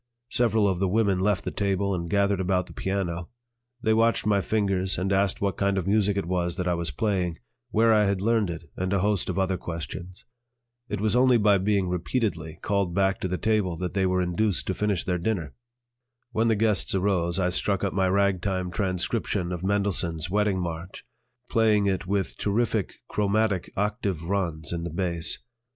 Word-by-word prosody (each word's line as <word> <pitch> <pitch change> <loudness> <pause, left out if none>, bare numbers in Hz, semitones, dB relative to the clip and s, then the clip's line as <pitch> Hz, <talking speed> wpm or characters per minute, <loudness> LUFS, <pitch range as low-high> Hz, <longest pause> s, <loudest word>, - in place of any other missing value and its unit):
Several 110 -3 +2
of 95 -3 0
the 95 - +1
women 100 -1 +2
left 100 -1 +1
the - - -3
table 100 0 0
and 85 -2 -3
gathered 100 0 +2
about 90 -1 +1
the - - -13
piano. 90 -3 -3 0.5
They 110 - +3
watched 115 0 +2
my 100 -2 +3
fingers 95 -1 0
and 95 +2 0
asked 100 0 +1
what 100 -3 0
kind 100 0 +1
of 95 - -1
music 100 0 +2
it 100 - -1
was 85 -1 -1
that 90 -1 -2
I 90 - +2
was 85 -2 -2
playing, 90 - -1 0.3
where 115 +1 +4
I 105 -1 +4
had 100 -1 0
learned 110 -1 +1
it, 85 -1 -6
and 95 0 -2
a 95 - +2
host 100 -2 +1
of 90 - -2
other 95 -1 +1
questions. 85 +2 -7 0.6
It - - -2
was 110 +1 +1
only 125 0 +5
by 105 -2 +4
being 100 -1 +1
repeatedly 90 -3 -2
called 100 -4 0
back 95 0 +2
to - - -2
the 90 0 -2
table 105 -6 0
that 90 +1 -4
they 95 -2 +2
were 90 0 +1
induced 90 +3 0
to 95 - -1
finish 105 -2 -1
their 90 -1 0
dinner. 85 -6 -2 0.8
When 115 0 +1
the 110 - +3
guests 105 -2 +2
arose, 90 -3 +1
I 90 -1 +2
struck 100 +2 +1
up 100 - 0
my 95 -1 +2
ragtime 95 -1 0
transcription 90 -2 -1
of 90 -2 -4
Mendelssohn's 95 -5 0
"Wedding 105 -2 +1
March," 85 +1 -6 0.4
playing 110 -3 +3
it 95 -1 -1
with 100 -1 -1
terrific 110 -1 0
chromatic 105 -2 0
octave 100 -4 -1
runs 85 -4 -1
in 85 -1 -3
the 85 - -3
bass. 85 -1 +1
95 Hz, 190 wpm, -26 LUFS, 90-105 Hz, 0.8 s, only